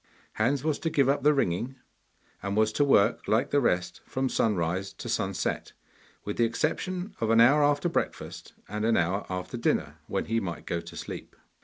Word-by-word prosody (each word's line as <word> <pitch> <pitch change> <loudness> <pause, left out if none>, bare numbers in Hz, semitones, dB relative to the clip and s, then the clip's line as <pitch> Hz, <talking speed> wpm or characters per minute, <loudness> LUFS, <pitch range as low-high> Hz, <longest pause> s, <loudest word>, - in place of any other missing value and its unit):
Hans 130 +5 +1
was 155 -2 0
to 165 - -1
give 140 -4 +3
up 140 +1 +2
the 150 - +5
ringing, 125 - 0 0.7
and 100 +1 -2
was 110 0 +3
to 145 - +3
work 115 -6 +3
like 110 - +2
the 145 - +3
rest 90 -6 0
from 130 0 -1
sunrise 95 -3 0
to - - -8
sunset, - - -2 0.5
with 105 - -4
the 120 - +3
exception 180 - -1
of 115 - +1
an 115 0 +5
hour 140 +6 +6
after 145 +3 +2
breakfast 170 - -3
and 105 +1 -3
an 115 0 +3
hour 90 +4 0
after 90 +6 -4
dinner, 115 - 0
when - - -1
he 115 +1 0
might 85 -7 -5
go 85 -1 -2
to 85 0 -11
sleep. - - -7
115 Hz, 190 wpm, -28 LUFS, 95-140 Hz, 0.7 s, hour